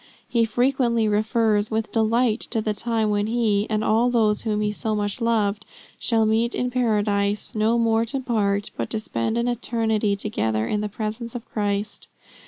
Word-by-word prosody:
He 230 Hz, -1 st, +2 dB
frequently 240 Hz, -1 st, +1 dB
refers 215 Hz, 0 st, +1 dB
with 220 Hz, 0 st, -2 dB
delight 225 Hz, +1 st, +2 dB
to 230 Hz, -, 0 dB
the 215 Hz, -1 st, -1 dB
time 220 Hz, -1 st, -1 dB
when 205 Hz, 0 st, 0 dB
he, 220 Hz, -3 st, +1 dB
and 215 Hz, -1 st, 0 dB
all 225 Hz, +3 st, +3 dB
those 220 Hz, -4 st, +2 dB
whom 210 Hz, -2 st, -1 dB
he 210 Hz, 0 st, 0 dB
so 215 Hz, +1 st, -2 dB
much 205 Hz, +3 st, -2 dB
loved, 215 Hz, -2 st, +1 dB, 0.4 s
shall 225 Hz, -2 st, +2 dB
meet 225 Hz, +2 st, +1 dB
in 250 Hz, 0 st, -1 dB
Paradise, 210 Hz, -4 st, 0 dB
no 220 Hz, +2 st, +2 dB
more 225 Hz, -1 st, +2 dB
to 250 Hz, +4 st, -3 dB
part, 205 Hz, -5 st, 0 dB
but -, -, -3 dB
to 220 Hz, -, -2 dB
spend 215 Hz, -, -2 dB
an 235 Hz, +1 st, 0 dB
eternity 225 Hz, -3 st, 0 dB
together 110 Hz, -, -1 dB
in 210 Hz, -, -1 dB
the 210 Hz, -, -3 dB
presence 220 Hz, +3 st, -5 dB
of 240 Hz, -, -6 dB
Christ. 205 Hz, 0 st, -2 dB
220 Hz, 180 wpm, -23 LUFS, 210-235 Hz, 0.4 s, all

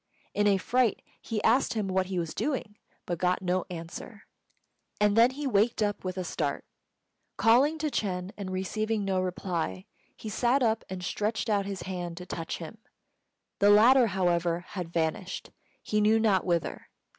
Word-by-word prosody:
In 205 Hz, 0 st, +2 dB
a 200 Hz, -1 st, +4 dB
fright 245 Hz, +2 st, +1 dB, 0.2 s
he 220 Hz, -3 st, -3 dB
asked 240 Hz, +2 st, +3 dB
him 210 Hz, -3 st, -1 dB
what 185 Hz, 0 st, 0 dB
he 190 Hz, -1 st, -3 dB
was 165 Hz, -2 st, -2 dB
doing, 260 Hz, -8 st, -2 dB, 0.3 s
but 175 Hz, -2 st, -3 dB
got 180 Hz, +1 st, +1 dB
no 180 Hz, 0 st, 0 dB
answer; 175 Hz, +5 st, -8 dB, 0.8 s
and 205 Hz, 0 st, +3 dB
then 230 Hz, +2 st, +7 dB
he 285 Hz, +3 st, -6 dB
waked 220 Hz, -2 st, +2 dB
up 205 Hz, -1 st, -2 dB
with 185 Hz, 0 st, -4 dB
a 185 Hz, -, -1 dB
start. 150 Hz, -4 st, -2 dB, 0.7 s
Calling 255 Hz, +9 st, +4 dB
to 305 Hz, -1 st, -2 dB
Ch'êng 185 Hz, -4 st, -2 dB
and 200 Hz, -2 st, -6 dB
receiving 210 Hz, +3 st, -1 dB
no 190 Hz, -1 st, +1 dB
reply, 175 Hz, -, -3 dB, 0.3 s
he -, -, -8 dB
sat 245 Hz, +5 st, +2 dB
up 225 Hz, -1 st, +1 dB
and 185 Hz, -1 st, -5 dB
stretched 215 Hz, +4 st, -1 dB
out 200 Hz, -1 st, +1 dB
his 195 Hz, -1 st, -5 dB
hand 175 Hz, -2 st, -5 dB
to 180 Hz, -, -7 dB
touch 165 Hz, -2 st, -4 dB
him. 170 Hz, +6 st, -9 dB, 0.8 s
The 200 Hz, -, +5 dB
latter, 235 Hz, +4 st, +7 dB
however, 175 Hz, -3 st, +1 dB
had 180 Hz, -4 st, -5 dB
vanished, 170 Hz, +3 st, -2 dB, 0.3 s
he 210 Hz, 0 st, 0 dB
knew 215 Hz, +2 st, +4 dB
not 200 Hz, -4 st, +2 dB
whither. 170 Hz, -2 st, -1 dB
195 Hz, 170 wpm, -28 LUFS, 180-220 Hz, 0.8 s, then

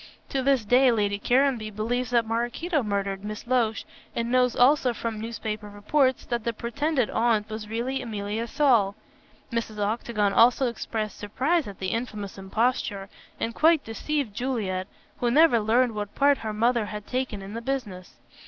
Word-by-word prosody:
To 270 Hz, -, -1 dB
this 265 Hz, -4 st, +2 dB
day 250 Hz, +4 st, +5 dB
Lady 205 Hz, -3 st, 0 dB
Caranby 250 Hz, -2 st, +2 dB
believes 240 Hz, +4 st, -2 dB
that 235 Hz, -2 st, +2 dB
Maraquito 240 Hz, +9 st, -1 dB
murdered 200 Hz, -3 st, -2 dB
Miss 210 Hz, +1 st, -6 dB
Loach, 235 Hz, -3 st, +1 dB, 0.3 s
and 235 Hz, 0 st, -1 dB
knows 250 Hz, -1 st, +3 dB
also 255 Hz, 0 st, +4 dB
from 220 Hz, -1 st, -4 dB
newspaper 215 Hz, -2 st, -5 dB
reports 255 Hz, +6 st, +1 dB
that 240 Hz, -2 st, -2 dB
the 235 Hz, -, -1 dB
pretended 260 Hz, +3 st, -1 dB
aunt 220 Hz, -2 st, +1 dB
was 215 Hz, -1 st, -6 dB
really 245 Hz, +4 st, -2 dB
Emilia 215 Hz, -1 st, -3 dB
Saul. 235 Hz, -9 st, +3 dB, 0.6 s
Mrs. 230 Hz, -2 st, -3 dB
Octagon 210 Hz, -1 st, 0 dB
also 245 Hz, +4 st, +5 dB
expressed 220 Hz, -3 st, -4 dB
surprise 270 Hz, +9 st, 0 dB
at 200 Hz, -, -8 dB
the 190 Hz, -, -3 dB
infamous 215 Hz, -4 st, -4 dB
imposture, 200 Hz, -1 st, -1 dB, 0.3 s
and 230 Hz, -, -2 dB
quite 320 Hz, +3 st, +4 dB
deceived 260 Hz, +1 st, -3 dB
Juliet, 205 Hz, -7 st, -2 dB, 0.3 s
who 240 Hz, -, +1 dB
never 295 Hz, -1 st, +5 dB
learned 230 Hz, +3 st, +2 dB
what 210 Hz, -1 st, -5 dB
part 285 Hz, 0 st, +4 dB
her 220 Hz, -, -4 dB
mother 230 Hz, +1 st, +1 dB
had 210 Hz, 0 st, -6 dB
taken 250 Hz, -6 st, -3 dB
in 195 Hz, +2 st, -8 dB
the 230 Hz, -, -4 dB
business. 230 Hz, -9 st, -4 dB
230 Hz, 160 wpm, -26 LUFS, 210-255 Hz, 0.6 s, day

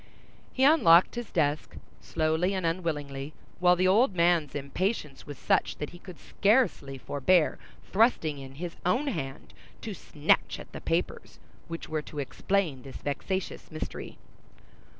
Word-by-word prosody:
He 265 Hz, -, 0 dB
unlocked 225 Hz, -, +6 dB
his 240 Hz, -2 st, -5 dB
desk, 150 Hz, -2 st, 0 dB, 0.3 s
slowly 160 Hz, +4 st, 0 dB
and 185 Hz, -2 st, -2 dB
unwillingly, 150 Hz, -4 st, -3 dB, 0.3 s
while 180 Hz, 0 st, +5 dB
the 185 Hz, +1 st, +2 dB
old 205 Hz, +2 st, +4 dB
man's 170 Hz, -4 st, +2 dB
impatience 145 Hz, +1 st, -3 dB
was 145 Hz, -2 st, -7 dB
such -, -, +1 dB
that 150 Hz, -, -5 dB
he 175 Hz, -, -12 dB
could 180 Hz, -3 st, -11 dB
scarcely 200 Hz, -, +1 dB
forbear 150 Hz, +5 st, +2 dB, 0.3 s
thrusting 190 Hz, -, +2 dB
in 135 Hz, 0 st, -10 dB
his 170 Hz, +3 st, -6 dB
own 235 Hz, +11 st, +1 dB
hand 135 Hz, -, -6 dB, 0.3 s
to -, -, -5 dB
snatch -, -, 0 dB
at -, -, -11 dB
the -, -, -8 dB
papers -, -, -2 dB, 0.3 s
which 165 Hz, 0 st, -6 dB
were 155 Hz, -1 st, -2 dB
to 150 Hz, -, -12 dB
explain 150 Hz, +1 st, -1 dB
this 135 Hz, -1 st, -11 dB
vexatious 185 Hz, +6 st, -4 dB
mystery. 155 Hz, -1 st, -7 dB
165 Hz, 145 wpm, -28 LUFS, 145-190 Hz, 0.3 s, unlocked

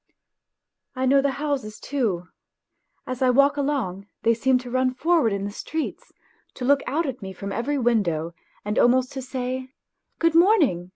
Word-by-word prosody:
I 260 Hz, 0 st, -1 dB
know 275 Hz, +1 st, +5 dB
the 275 Hz, -1 st, 0 dB
houses 275 Hz, -7 st, -3 dB
too. 215 Hz, -11 st, -2 dB, 0.8 s
As 255 Hz, 0 st, -5 dB
I 260 Hz, -, +4 dB
walk 280 Hz, +3 st, +4 dB
along 260 Hz, -10 st, -2 dB, 0.2 s
they 230 Hz, -, +4 dB
seem 255 Hz, +3 st, +2 dB
to 250 Hz, -1 st, -7 dB
run 255 Hz, 0 st, +1 dB
for 335 Hz, +6 st, +2 dB
ward 230 Hz, -8 st, +2 dB
in 200 Hz, 0 st, -2 dB
the 205 Hz, -, -4 dB
streets 315 Hz, +9 st, -5 dB, 0.4 s
to 250 Hz, -, -5 dB
look 280 Hz, +1 st, +4 dB
out 320 Hz, +5 st, 0 dB
at 265 Hz, -3 st, -5 dB
me 190 Hz, -1 st, -6 dB
from 200 Hz, +2 st, -6 dB
every 280 Hz, +7 st, -1 dB
window, 185 Hz, -, 0 dB, 0.3 s
and 210 Hz, +1 st, 0 dB
almost 255 Hz, +1 st, +3 dB
to 265 Hz, -, -5 dB
say: 255 Hz, 0 st, -4 dB, 0.3 s
" -, -, -52 dB
Good 330 Hz, -1 st, +2 dB
morning 325 Hz, -, +4 dB
255 Hz, 180 wpm, -24 LUFS, 215-280 Hz, 0.8 s, know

